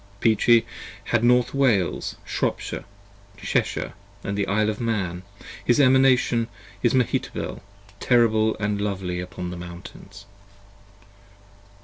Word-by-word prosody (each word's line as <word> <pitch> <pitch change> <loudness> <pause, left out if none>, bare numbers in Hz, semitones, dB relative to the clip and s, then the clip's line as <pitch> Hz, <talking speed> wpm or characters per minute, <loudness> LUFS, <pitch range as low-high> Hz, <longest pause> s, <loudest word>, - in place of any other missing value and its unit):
30 110 -1 +4
Peachey 115 +2 +4 0.5
had 120 -1 +2
North 125 0 +3
Wales, 120 -10 +1
Shropshire, - - -3 0.5
Cheshire 100 -5 -1 0.2
& 100 - -28
the 100 0 -2
Isle 105 +2 +2
of 105 - -7
Man, 95 -7 -2 0.4
His 120 - +3
Emanation 130 -3 +4 0.3
is 120 +1 +2
Mehetabel, 125 -2 -1 0.4
terrible 110 -3 +3
& - - -21
lovely 100 -3 -2
upon 90 0 -6
the 90 - -6
Mountains. 90 +3 -11
110 Hz, 110 wpm, -24 LUFS, 100-120 Hz, 0.5 s, 30